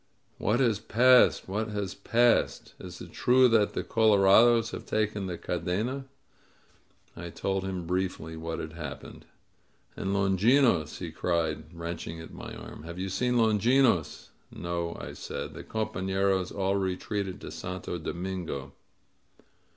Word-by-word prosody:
^^What 110 Hz, +4 st, +1 dB
has 115 Hz, -6 st, +2 dB
passed? 125 Hz, +3 st, +5 dB
What 105 Hz, +4 st, -2 dB
has 105 Hz, -3 st, -3 dB
passed? 120 Hz, 0 st, +1 dB
Is -, -, -9 dB
it -, -, -9 dB
true 130 Hz, +1 st, +4 dB
that 110 Hz, -3 st, +3 dB
the -, -, -2 dB
colorados 110 Hz, +2 st, +5 dB
have -, -, -7 dB
taken 105 Hz, -2 st, -1 dB
the 90 Hz, -2 st, -4 dB
Cadena?" 105 Hz, +12 st, -2 dB, 1.1 s
I 85 Hz, +1 st, -7 dB
told 95 Hz, +2 st, -2 dB
him 95 Hz, -2 st, -4 dB
briefly 90 Hz, -2 st, -2 dB
what 80 Hz, 0 st, -4 dB
had 80 Hz, 0 st, -6 dB
happened. 75 Hz, -4 st, -8 dB, 0.7 s
^^And -, -, -6 dB
Longinos?'' 100 Hz, -, +3 dB
he 85 Hz, -3 st, -6 dB
cried, 80 Hz, -2 st, -1 dB
wrenching 85 Hz, -1 st, -6 dB
at 80 Hz, -, -10 dB
my -, -, -8 dB
arm. -, -, -10 dB
Have 85 Hz, +2 st, -8 dB
you 95 Hz, +1 st, -3 dB
seen 125 Hz, +6 st, 0 dB
Longinos?" 115 Hz, -, +2 dB, 0.2 s
"No," 85 Hz, -1 st, -4 dB
I -, -, -7 dB
said. -, -, -6 dB
"The -, -, -8 dB
compaiieros 95 Hz, -3 st, -1 dB
all 100 Hz, 0 st, 0 dB
retreated 95 Hz, 0 st, -2 dB
to -, -, -7 dB
Santo 90 Hz, +1 st, -5 dB
Domingo." 85 Hz, -5 st, -5 dB
95 Hz, 135 wpm, -28 LUFS, 85-110 Hz, 1.1 s, passed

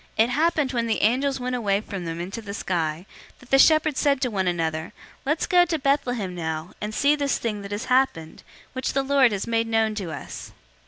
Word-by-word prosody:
002:015 220 Hz, -, +6 dB
It -, -, -4 dB
happened, 300 Hz, -1 st, +1 dB
when 235 Hz, -1 st, 0 dB
the 225 Hz, -, 0 dB
angels 265 Hz, +5 st, +2 dB
went 250 Hz, 0 st, -2 dB
away 200 Hz, -5 st, +1 dB
from 195 Hz, -4 st, -6 dB
them 165 Hz, 0 st, -4 dB
into 195 Hz, +6 st, -5 dB
the 200 Hz, -2 st, -7 dB
sky, 165 Hz, -3 st, -2 dB, 0.3 s
that 250 Hz, -, -19 dB
the 270 Hz, -, +5 dB
shepherds 310 Hz, -1 st, +4 dB
said 280 Hz, -2 st, +2 dB
one 200 Hz, -6 st, -1 dB
to -, -, +2 dB
another, 160 Hz, -1 st, -2 dB, 0.3 s
"Let's 305 Hz, +3 st, +1 dB
go 355 Hz, -1 st, +5 dB
to 335 Hz, -2 st, -1 dB
Bethlehem, 250 Hz, -9 st, 0 dB
now, 160 Hz, -1 st, -4 dB
and 210 Hz, -, -3 dB
see 285 Hz, +1 st, +3 dB
this 285 Hz, -2 st, 0 dB
thing 215 Hz, -3 st, -3 dB
that 200 Hz, 0 st, -8 dB
has 205 Hz, +5 st, -3 dB
happened, 250 Hz, -11 st, 0 dB, 0.3 s
which 260 Hz, -1 st, -2 dB
the 275 Hz, -, +1 dB
Lord 270 Hz, -3 st, +4 dB
has 200 Hz, -1 st, -2 dB
made 230 Hz, 0 st, 0 dB
known 225 Hz, -1 st, +1 dB
to 195 Hz, -6 st, -5 dB
us." 150 Hz, -, -8 dB
230 Hz, 220 wpm, -24 LUFS, 190-275 Hz, 0.3 s, 002:015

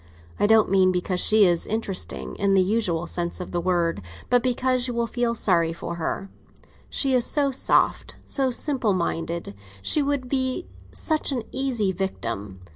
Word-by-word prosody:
I -, -, +3 dB
don't 220 Hz, -2 st, +4 dB
mean 190 Hz, -1 st, +4 dB
because 180 Hz, 0 st, -1 dB
she 215 Hz, +1 st, +5 dB
is 175 Hz, -2 st, +2 dB
interesting 210 Hz, -4 st, -2 dB
in 195 Hz, 0 st, +2 dB
the 190 Hz, -, +5 dB
usual 185 Hz, -5 st, 0 dB
sense 175 Hz, +1 st, -4 dB
of 180 Hz, -, -6 dB
the 175 Hz, -, -1 dB
word, 170 Hz, -, 0 dB, 0.3 s
but 245 Hz, -1 st, +5 dB
because 255 Hz, 0 st, +1 dB
you 245 Hz, -, -4 dB
would 235 Hz, -1 st, -1 dB
feel 240 Hz, -1 st, 0 dB
sorry 170 Hz, -6 st, +1 dB
for 170 Hz, +1 st, -6 dB
her. 180 Hz, +3 st, -3 dB, 0.6 s
She 270 Hz, -2 st, 0 dB
is 250 Hz, -2 st, +3 dB
so 280 Hz, +1 st, +1 dB
soft, 260 Hz, -, +1 dB
so 270 Hz, -2 st, +1 dB
simple 250 Hz, -4 st, 0 dB
minded, 170 Hz, -, -3 dB, 0.3 s
she 300 Hz, -, +3 dB
would 280 Hz, -2 st, -1 dB
be 260 Hz, +5 st, -1 dB, 0.3 s
such 310 Hz, -2 st, 0 dB
an 250 Hz, -4 st, -2 dB
easy 250 Hz, -7 st, 0 dB
victim! 105 Hz, -, -4 dB
210 Hz, 170 wpm, -24 LUFS, 175-255 Hz, 0.6 s, she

